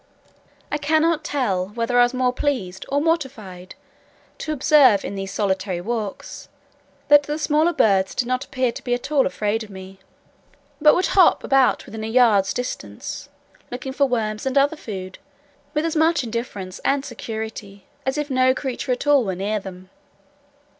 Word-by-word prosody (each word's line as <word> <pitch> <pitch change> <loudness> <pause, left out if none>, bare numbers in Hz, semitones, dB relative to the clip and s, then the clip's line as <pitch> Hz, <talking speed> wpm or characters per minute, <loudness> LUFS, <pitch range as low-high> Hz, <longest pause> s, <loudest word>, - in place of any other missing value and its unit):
I 295 - -1
cannot 315 +2 +2
tell 205 -12 -1
whether 240 +1 +1
I 245 - +6
were 255 +1 -7
more 250 -1 +1
pleased 205 -10 -3
or 280 +2 +1
mortified 245 - -3 0.6
to 310 - -4
observe, 280 -7 +4
in - - -4
those 195 0 -5
solitary 190 -2 -1
walks, 215 +1 -5 0.6
that 290 0 +7
the 295 +1 -4
smaller 310 +2 +2
birds 195 - +2
did 245 - -1
not 255 +1 -1
appear 255 -2 -1
to - - -10
be 245 -1 0
at 245 +4 -7
all 285 -3 +3
afraid 210 +4 -1
of 215 - -12
me, 190 0 -11 0.8
but 300 0 +6
would 370 - +1
hop 375 -3 +5
about 270 -2 +2
within 220 0 -7
a - - -3
yard's 220 -5 +4
distance, 250 0 -6 0.4
looking 265 +2 -6
for 280 0 +2
worms 220 -2 -2
and 265 +1 0
other 285 +3 +3
food, 190 -9 -8 0.6
with 300 +2 +1
as 330 - -2
much 320 -2 +3
indifference 220 -5 -5
and 275 0 +1
security 220 -5 -7 0.2
as 265 +2 -2
if 295 -1 -3
no 255 0 +3
creature 260 -1 -3
at 245 - -5
all 290 -3 +4
were 190 -4 -3
near 205 +3 -2
them. 185 -1 -11
245 Hz, 170 wpm, -22 LUFS, 200-285 Hz, 0.8 s, that